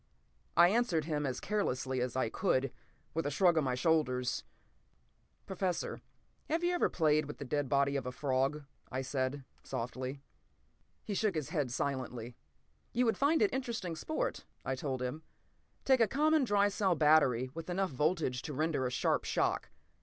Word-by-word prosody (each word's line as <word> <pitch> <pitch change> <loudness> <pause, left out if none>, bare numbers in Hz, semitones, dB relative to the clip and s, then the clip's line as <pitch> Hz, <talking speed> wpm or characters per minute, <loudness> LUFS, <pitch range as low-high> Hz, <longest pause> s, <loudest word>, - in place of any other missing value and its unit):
I 175 +1 +8
answered 195 -8 +1
him, 150 -3 -1
as 130 - -3
carelessly 130 -11 -1
as 125 0 -2
I 130 - +1
could, 130 +3 0 0.4
with 165 -2 -1
a - - +1
shrug 175 +4 +4
of 160 - +3
my 130 -2 0
shoulders. 125 -4 +1 1.0
"Professor, 185 -2 -2 0.5
have 325 +3 0
you 350 +1 +2
ever 355 - +2
played 155 -2 +2
with 150 - -7
the 140 - -6
dead 145 0 -1
body 140 0 +2
of 135 -3 -2
a - - -2
frog?" 135 +2 0 0.3
I 130 +1 -2
said 130 +1 -2 0.2
softly. 130 +3 -5 0.8
He 210 - -4
shook 200 -2 +1
his 150 -2 -2
head 150 -6 -1
silently. 125 -3 -3 0.6
"You 245 +2 +2
would 225 - +2
find 305 +6 +4
it 405 - +2
interesting 230 -10 -3
sport," - - -2 0.2
I 135 - 0
told 130 -1 -3
him. 125 +5 -3 0.6
"Take 265 -1 +5
a 225 - +5
common 305 +2 +3
dry 205 -2 +3
cell 195 -3 +1
battery 145 -5 +4
with 165 +2 -7
enough 190 0 0
voltage 150 -2 0
to 150 - -6
render 150 -2 0
a - - -1
sharp - - +1
shock. - - 0
150 Hz, 170 wpm, -33 LUFS, 130-195 Hz, 1.0 s, I